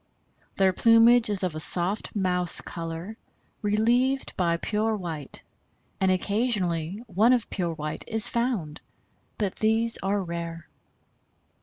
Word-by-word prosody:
Their 190 -1 +2
plumage 230 +2 +5
is 200 -2 -1
of 180 -3 -1
a 155 - -5
soft 180 +7 +3
mouse 180 -3 +2
color 170 +5 -7 0.4
relieved 240 +6 0
by 170 -2 0
pure 215 +4 -1
white, 165 -8 -4 0.6
and 190 - +2
occasionally 190 -2 -1
one 220 +4 +3
of 245 -3 -1
pure 175 -4 -2
white 150 0 -5
is 225 +1 +2
found, 235 -12 -2 0.6
but 200 -3 -3
these 225 +1 +2
are 195 0 -1
rare. 170 -1 -6
195 Hz, 125 wpm, -25 LUFS, 170-225 Hz, 0.6 s, plumage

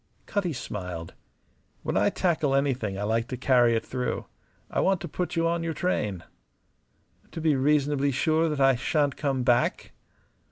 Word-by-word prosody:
Cutty 200 -4 -1
smiled. 90 - -6 0.7
"When - - -2
I - - +3
tackle 155 -6 +1
anything 130 -8 0
I 100 - -3
like 115 +2 0
to 125 - -5
carry 120 -2 +4
it 110 - -1
through. 125 -1 -3 0.4
I - - -2
want 190 -1 +2
to - - -4
put 180 +3 -3
you 165 0 +2
on 170 0 0
your 165 -1 -3
train." 105 - -1 1.1
"To - - -6
be 155 -2 +2
reasonably 145 0 +2
sure 160 +4 +2
that 150 -2 -2
I 135 -1 +5
shan't 145 +3 0
come 135 -4 -1
back?" 120 -1 +1
135 Hz, 165 wpm, -27 LUFS, 120-160 Hz, 1.1 s, I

